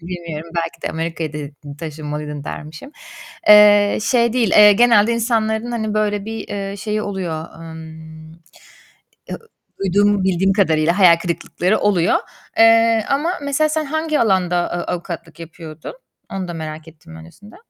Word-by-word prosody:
Bilmiyorum 170 -2 -7
belki 165 0 -4
de - - -2
Amerika'ya 165 -1 -4
de 150 -1 -7 0.3
taşınmalıydın 150 -2 -6
dermişim. 155 - -9 0.6
Eee, 205 -1 +7
şey 235 0 +2
değil, 235 -5 +1
eee, 210 0 +7
genelde 235 0 +4
insanların, 230 0 -1
hani, 220 -2 -3
böyle 210 -1 -1
bir, 225 0 -7
eee, 200 0 -5
şeyi 215 +1 -3
oluyor. 175 -5 -4
Emm, 160 -1 -11 1.0
eee, - - -5 0.4
duyduğum, 200 +1 +2
bildiğim 190 +1 +2
kadarıyla 170 -2 +1
hayal 175 -3 +7
kırıklıkları 175 +3 -2
oluyor. 190 -4 +2 0.4
Eee, 225 -1 +5
ama 295 +6 0
mesela 285 +2 +1
sen 310 0 -1
hangi 315 +1 -1
alanda, 180 -5 +1
ııı, 175 - -3
avukatlık 170 -2 -6
yapıyordun? 160 - -10 0.4
Onu 190 -2 -4
da 175 - -5
merak 155 0 -7
ettim 160 +1 -15
öncesinde. 175 - -15
190 Hz, 140 wpm, -19 LUFS, 165-220 Hz, 1.0 s, Eee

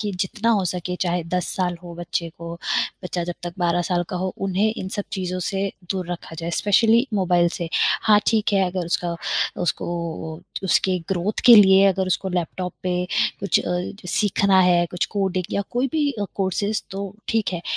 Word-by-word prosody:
कि 205 -2 -2
जितना 215 +5 0
हो 205 -5 +2
सके, 180 0 -3
चाहे 175 -1 0
10 180 +1 -2
साल 180 -2 0
हो 170 -1 -9
बच्चे 170 0 -3
को, 170 0 -6 0.5
बच्चा 175 -1 -2
जब 175 - -4
तक 175 - -4
12 175 0 +1
साल 175 0 0
का 185 - -3
हो, 185 +1 -2
उन्हें 195 +3 +1
इन 185 - -4
सब 205 - -2
चीज़ों 185 -2 -2
से 195 +2 -1 0.2
दूर 185 -3 -2
रखा 165 -1 -8
जाए, 165 0 -3
स्पेशली 225 +4 +4
मोबाइल 175 -3 +3
से। 170 -2 -3 0.3
हाँ, 210 -1 +6
ठीक 220 -2 +2
है, 195 -1 +4
अगर 180 -2 -3
उसका 170 0 -1 0.5
उसको 170 -5 -1 0.5
ओ, - - -13 0.3
उसके 185 0 +2
ग्रोथ 195 +2 -1
के 240 - +11
लिए 195 -1 +7
अगर 190 -1 +1
उसको 185 +1 -1
लैपटॉप 180 0 -3
पे 180 0 0 0.4
कुछ 200 - +2
अ, 180 0 -1 0.3
सीखना 195 0 +3
है, 175 -1 +4
कुछ 180 - -1
कोडिंग 190 -2 0
या 200 - 0
कोई 250 +3 0
भी 300 -2 +2
अ, 205 -4 -3
कौर्सेस, 200 +2 -1
तो 195 0 -5
ठीक 220 -4 0
है। 170 - -4
185 Hz, 195 wpm, -23 LUFS, 175-200 Hz, 0.5 s, के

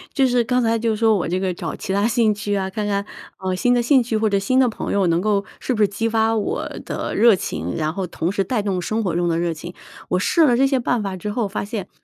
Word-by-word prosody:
就 270 - +4
是 245 -2 +2
刚 250 +1 +1
才 230 0 +1
就 225 -1 0
说 220 0 +3
我 175 - -2
这 185 +2 -1
个 185 -1 -1
找 - - -5
其 190 - -5
它 200 +2 +2
兴 225 -2 +2
趣 205 0 -2
啊， 190 -1 -1
看 210 +2 -3
看， 200 0 -1 0.3
呃， 190 -1 -2
新 245 +7 +2
的 240 - +3
兴 265 +2 +4
趣 235 -1 -2
或 215 0 +2
者 200 - +2
新 225 +7 0
的 260 -2 +4
朋 220 - -4
友 200 -2 +2
能 170 0 +2
够 200 +1 +1 0.2
是 255 - -2
不 215 - -1
是 200 - +3
激 215 +3 -2
发 225 0 +2
我 205 - -2 0.2
的 - - -4
热 230 -2 +5
情， 90 - -4
然 155 +1 -1
后 190 -1 -3
同 170 +1 -2
时 200 - -1
带 215 +3 -1
动 190 -3 -2
生 220 +5 -1
活 185 - -1
中 175 +1 0
的 165 -1 +1
热 170 -1 0
情。 170 +3 -9 0.3
我 180 - +1
试 320 - +3
了 245 -4 +4
这 270 - +3
些 270 -1 +2
办 240 -2 0
法 195 -2 -4
之 210 +4 -5
后 220 -3 -1
发 195 - -3
现， 205 -3 -5
210 Hz, 310 characters per minute, -21 LUFS, 190-230 Hz, 0.3 s, 热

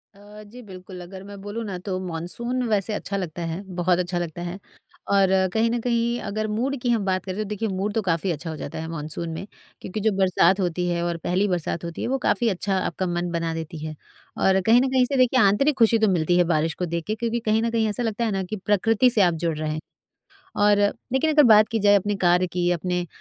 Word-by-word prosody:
अ, 205 +1 -13
जी 225 +4 -12
बिल्कुल, 185 -3 -11
अगर 190 +2 -10
मैं 200 0 -10
बोलूँ 205 +3 -5
ना 195 -3 -4
तो 185 -2 -2
मानसून 210 +10 -3
वैसे 210 0 0
अच्छा 200 -1 -3
लगता 175 -3 -5
है, 170 +4 -4
बहुत 175 0 +2
अच्छा 180 0 -2
लगता 175 0 -5
है 175 +2 -5 0.5
और 195 -1 +4 0.2
कहीं 225 +1 +2
न 240 - 0
कहीं 235 0 0
अगर 215 +2 -2
मूड 240 +6 -1
की 245 - -1
हम 225 -4 +1
बात 185 -1 0
करें, 190 0 -5
तो 215 - -1
देखिए 210 +1 -2
मूड 195 +2 -2
तो 225 - +1
काफ़ी 175 0 0
अच्छा 165 +1 -5
हो 160 - -4
जाता 145 - -6
है 160 - -5
मानसून 165 +1 -5
में, 165 +5 -6 0.3
क्योंकि 190 - -5
जो 220 +1 +2
बरसात 190 +1 +3
होती 180 -1 -1
है 170 0 -1
और 170 -1 -1
पहली 190 +4 +1
बरसात 170 -2 -2
होती 170 -1 -6
है, - - -2
वो 265 +2 0
काफ़ी 235 - +2
अच्छा 195 0 -1
आपका 185 - -2
मन 175 0 -2
बना 165 -1 -2
देती 160 0 -6
है। 155 0 -6 0.5
और 190 0 +4
कहीं 230 +5 +5
न 265 - +1
कहीं 260 -1 +4
से 275 +2 -2
देखिए 255 0 +4
आंतरिक 235 +9 +3
खुशी 230 -1 +4
तो 220 - +3
मिलती 175 0 +2
है 180 - +5
बारिश 160 +1 +1
को 180 - 0
देख 170 -1 -3
के 215 - -1
क्योंकि 235 +1 -2
कहीं 220 +1 +3
न 230 - 0
कहीं 225 -1 +1
ऐसा 225 +4 -3
लगता 225 0 -1
है 220 - 0
ना 195 -1 -1
कि 185 +4 -5
प्रकृति 225 +4 +3
से 230 -4 +2
आप 175 -3 +4
जुड़ 165 -2 0
रहे 155 0 -2
हैं, 155 - -3 0.8
और 205 0 +4 0.3
लेकिन 265 +4 +2
अगर 300 0 +6
बात 215 0 +6
की 225 - -1
जाए 205 0 +5
अपने 205 +1 0
कार्य 180 +1 +4
की, 175 0 -1
अपने 180 +1 -2
195 Hz, 250 wpm, -24 LUFS, 175-220 Hz, 0.8 s, अगर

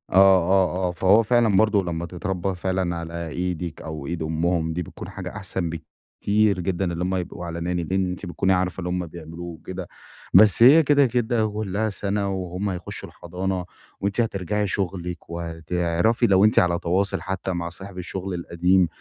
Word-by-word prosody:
آه، 95 -1 +4
آه، - - -2
فهو 95 +5 +4
فعلًا 115 -2 +3
برضو 105 -1 +3
لمّا 85 -1 -3
تتربى 95 +2 -3
فعلًا 90 -1 -1
على 85 0 -5
إيدِك 90 -1 -3
أو 80 -3 -6
إيد 85 0 -3
أمهم 80 +1 0
دي 90 - -2
بتكون - - -9
حاجة - - -6
أحسن 95 -4 -2
بكتير 100 +5 -1
جدًا 90 0 -1
اللي 85 +1 -2
هُم 95 +1 0
يبقوا 90 -1 -4
على 85 0 -5
Nanny 85 -2 -2
لأن 95 -1 +1
أنتِ 90 +2 -5
بتكوني 95 +2 +1
عارفة 90 0 0
اللي 90 -1 -3
هُم 90 0 -1
بيعملوه 85 +1 -9
وكده، 85 -2 -7 0.5
بس 110 +1 +7
هي 150 +6 +8
كده، 145 -1 +4
كده، 120 -2 +1
كلّها 105 0 -2
سَنة 100 0 -1
وهُم 95 +1 -3
هيخشوا 90 -2 -6
الحضانة 90 +1 -4 0.4
وأنتِ 100 +4 0
هترجعي 105 -1 -1
شغلِك 90 -2 -3
وهتعرفي 85 +4 0
لو 95 +1 +5
أنتِ 110 - +5
على 85 -1 +2
تواصل 95 +4 0
حتى 95 0 -3
مع 85 -1 -3
صاحب 95 +2 -9
الشغل 95 +1 -4
القديم، 90 +1 +2
90 Hz, 170 wpm, -24 LUFS, 85-100 Hz, 0.5 s, هي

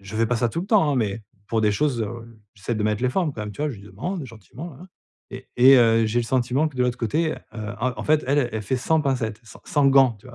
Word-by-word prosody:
je 100 +2 -8
fais 115 +1 +2
pas 125 - 0
ça 120 +1 +1
tout 165 - -3
le - - -8
temps 200 -8 +3
hein, 140 - 0
mais 110 -2 -1 0.2
pour 115 +1 0
des 105 -1 +3
choses, 130 0 0
heu, 115 +1 -8 0.2
j'essaie 110 +3 -4
de 105 - -2
mettre 105 +1 0
les 125 - +2
formes 165 +1 0
quand 110 - -6
même 105 0 -6
tu 145 - -10
vois? 150 - 0
Je 125 - -8
lui 100 - -14
demande 140 - -5
gentiment 115 - -10
nin 130 - -15
nin, 180 - -13 0.4
et 130 0 -10
et 130 +2 +8
heu, 115 -2 +4
j'ai 120 +3 +1
le - - -3
sentiment 130 +5 +1
que 140 - -15
de 125 - +2
l'autre 125 -1 0
côté, 155 +8 0
heu, - - -7 0.4
en 130 - 0
en - - -6
fait, 155 0 +2
elle 140 -2 +2
elle 110 -1 -3
fait 130 +6 -1
sans 160 +5 +1
pincettes, 120 -6 -2
sans 110 - -14
sans 145 -1 +2
gants, 135 -4 +5
tu - - -17
vois?? 120 - -12
125 Hz, 300 wpm, -23 LUFS, 110-140 Hz, 0.4 s, et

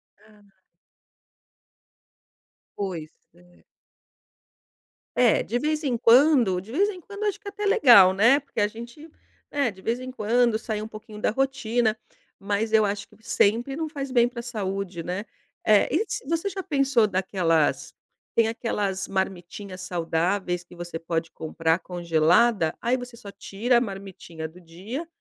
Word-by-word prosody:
Ah. 205 -3 -24 2.2
Pois, 180 -6 -4 0.2
é. 175 +1 -23 1.6
É, 245 -3 +5
de 235 - -2
vez 305 +4 -1
em 255 -5 0
quando 240 -5 +5
de 205 +4 -13
vez 380 +10 +2
em 370 -3 -7
quando 405 +4 -8
acho 415 0 -1
que 415 - -13
é - - -2
até 415 +1 -5
legal, 235 - +7
né. 230 +9 +5
Porque 275 -4 -7
a 205 - +3
gente, 235 +8 -11 0.4
né, 280 -5 +1
de 190 -1 -16
vez 230 +5 -1
em 255 0 -7
quando 235 -1 +1
sair 215 -1 -4
um - - -6
pouquinho 215 -1 -11
da - - +1
rotina 245 -3 0 0.4
mas 205 +2 -1
eu 220 -1 +5
acho 200 0 -3
que - - -22
sempre, 235 +6 +2
não 320 +1 -3
faz 275 -3 -5
bem 240 -1 +4
para 240 -1 -7
a - - -15
saúde, 195 -6 -4
né, 180 +5 -4 0.4
eh, 210 -1 +4
e 340 - +1 0.2
você 330 +4 0
já 385 0 -5
pensou 275 - +2
daquelas 185 -5 0 0.4
tem 230 -1 +4
aquelas 205 -4 -2
marmitinhas 190 0 -4
saudáveis 175 +1 -1
que 175 - -16
você 175 -1 -6
pode 165 0 -3
comprar 160 +1 -1
congelada, 175 +2 +2
aí 240 +2 +1
você 245 -2 -8
só 205 -4 -10
tira 235 +5 0
a - - -4
marmitinha 195 -6 -7
do 175 +3 -16
dia, 195 - -7
215 Hz, 155 wpm, -25 LUFS, 185-250 Hz, 2.2 s, legal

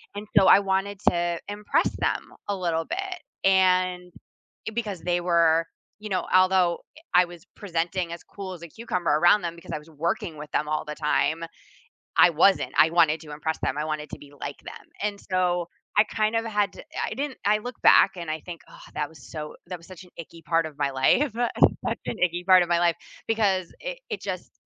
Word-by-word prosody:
and, 205 +1 -6
so, 195 - +7
I - - +8
wanted 195 +1 0
to 175 -1 -1
impress 205 0 0 0.2
them - - -2 0.2
a 200 - +1
little 165 -3 -1
bit. - - -6 0.4
And, 185 -1 +3 0.6
eh, - - -2
because 210 -6 -3
they 175 +1 0
were 165 -2 +3 0.4
you 215 - -5
know, 185 -3 -1
although, 185 -2 +4 0.2
eh, - - -15
I 180 0 +6
was 175 -2 -13 0.2
presenting 175 -2 -2
as 170 - -8
cool 195 -2 -8
as 170 -2 -11
a - - -7
cucumber 180 -2 -2
around 175 +3 +5
them, 170 -1 -3
because 170 - -11
I 155 - -2
was 150 +2 -17 0.2
working 170 -1 -1
with 150 0 -8
them 150 - 0
all 155 0 -1
the 150 0 -6
time, 160 +2 0 0.7
I - - +8
wasn't. 175 +5 +3
I 160 - +6
wanted 165 -2 +4
to 150 - -11
impress 160 +2 -3
them, 135 - 0
I 150 - -1
wanted 155 -1 -4
to - - -6
be 145 - -14
like 145 - -6
them, - - -10 0.2
and, 205 -1 -2
so, 180 -2 +1 0.3
I 210 - +6
kind 215 +1 -1
of 225 - -1
had 210 -2 0
to - - -10 0.2
I - - -4
didn't 280 -1 -4
I 210 +1 +4
look 245 +3 -7
back 195 - +7
and 170 -3 -4
I 155 - -3
think, 175 -2 -9
"Oh, - - -15 0.2
that 150 -1 -2
was 155 -5 -15
so 150 -1 -6
that 180 0 -5
was 170 - -18
such 185 -1 -12
an 180 - -20
icky 165 0 -10
part 165 0 +1
of 155 -2 -9
my 140 -1 0
life." 175 - +2
Such 240 +1 +1
an - - -3
icky 175 0 -4
part 185 -1 +7
of 175 - -6
my 170 -1 +3
life 170 -1 +3 0.3
because 200 -5 +1
it - - -5
it - - -4
just - - -5
175 Hz, 220 wpm, -25 LUFS, 165-195 Hz, 0.7 s, I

